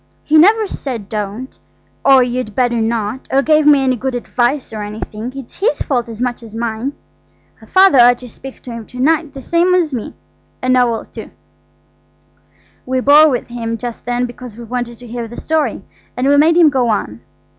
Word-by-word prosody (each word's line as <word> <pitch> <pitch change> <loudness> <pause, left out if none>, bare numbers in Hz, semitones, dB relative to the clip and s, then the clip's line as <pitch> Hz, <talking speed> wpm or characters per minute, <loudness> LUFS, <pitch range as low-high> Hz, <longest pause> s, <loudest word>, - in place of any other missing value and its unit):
He 305 - 0
never 425 +6 +5
said 245 - -6
don't, 215 +4 -5 0.4
or 265 -2 +6
you'd 245 -3 -4
better 245 -3 +1
not, 225 +2 -2
or 275 +1 +2
gave 305 0 +3
me 285 -2 +6
any 260 -1 +2
good 260 +2 -3
advice 245 +1 -1
or 215 - -5
anything. 215 +2 -6
It's 270 -3 -10
his 430 +6 0
fault 245 -5 -1
as 225 +2 -5
much 245 -1 -3
as 225 -2 -12
mine. 230 +4 -3 0.7
Father 375 -8 +5
ought 245 0 +6
to 250 - -11
speak 265 +3 -11
to 250 - -9
him 230 -2 -8
to 250 - -11
night 305 +1 +1
the 270 - -8
same 345 +2 +2
as 330 -5 0
me–and 255 +2 -5
Noël, 240 -3 +1
too." - - -9 1.5
We 260 0 -1
bore 295 +4 +6
with 250 -3 -3
him 230 -1 -4
just 240 0 -7
then 245 +1 -1
because 245 -2 -10
we 240 - -8
wanted 240 0 -4
to 245 - -12
hear 235 0 -5
the 240 - -11
story. 315 -1 -1 0.3
And 255 +2 0
we 285 - +5
made 320 +4 +4
him 335 -3 +7
go 255 -3 +1
on. 115 - -2
250 Hz, 190 wpm, -16 LUFS, 230-280 Hz, 1.5 s, him